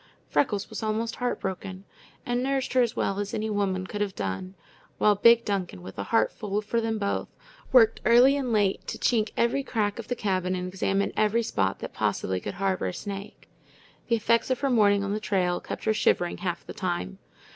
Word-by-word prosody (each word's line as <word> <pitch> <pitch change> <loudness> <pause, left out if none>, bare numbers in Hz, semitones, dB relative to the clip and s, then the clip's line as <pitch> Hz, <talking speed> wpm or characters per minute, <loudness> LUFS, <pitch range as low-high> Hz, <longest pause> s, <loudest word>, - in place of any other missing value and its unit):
Freckles 205 -7 +1
was - - -6
almost 220 +1 -2
heartbroken, 190 -5 -3 0.4
and 245 0 0
nursed 270 0 -1
her 255 - +5
as 235 -2 0
well 195 0 -1
as 205 0 -3
any 215 0 -2
woman 190 -2 0
could 205 +2 -5
have 200 -2 -1
done; 100 - -4 0.4
while 210 - +4
big 230 +3 +5
Duncan, 185 - -3
with 95 +2 -9
a 100 - -3
heart 225 - +2
full 205 -1 -3
for 230 +2 0
them 225 -1 -1
both, 200 -1 -1 0.4
worked 225 -4 +5
early 245 +4 +6
and 265 -4 -2
late 205 -3 +1
to - - -4
chink 220 -3 +1
every 235 +4 +2
crack 215 -5 -1
of 230 - -7
the 245 - -1
cabin 185 -4 -1
and 180 0 -3
examine 195 +1 -1
every 215 +2 +2
spot 95 - 0
that - - -6
possibly 95 0 -1
could - - -6
harbor 190 - 0
a 90 - -3
snake. 200 0 -7 0.6
The 235 - +3
effects 230 +2 +2
of 255 - 0
her 275 -2 +1
morning 205 -4 +4
on 200 0 -2
the 210 - -1
trail 185 -4 0
kept - - -7
her 220 - +2
shivering 175 -4 +1
half 175 -3 -3
the - - -8
time. 190 +1 -3
205 Hz, 205 wpm, -27 LUFS, 190-230 Hz, 0.6 s, early